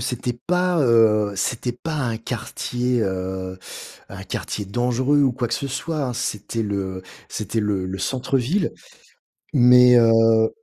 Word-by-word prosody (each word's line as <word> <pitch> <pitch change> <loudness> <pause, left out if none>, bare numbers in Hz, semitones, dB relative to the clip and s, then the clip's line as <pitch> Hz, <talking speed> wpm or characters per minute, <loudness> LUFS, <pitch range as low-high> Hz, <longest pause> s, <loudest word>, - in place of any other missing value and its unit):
c'était 125 0 -3
pas, 180 -1 +1
heu, 110 -4 +4
c'était 120 +5 -2
pas 155 +6 -6
un 120 -6 -1
quartier, 120 +1 -3
heu, 95 -1 -3 0.5
un - - -9
quartier 105 - -4
dangereux 125 +7 +1
ou 135 -3 +3
quoi 120 0 -2
que - - -2
ce 140 - -4
soit, 155 +3 -3
hein. 125 - -3
C'était 110 0 -3
le 95 -2 -3 0.3
c'était 110 +2 -3
le 100 -3 -1
le 95 +1 -5
centre-ville. 130 - -1 0.8
Mais, 125 -1 +7
heu 115 -1 +4
120 Hz, 140 wpm, -22 LUFS, 105-125 Hz, 0.8 s, Mais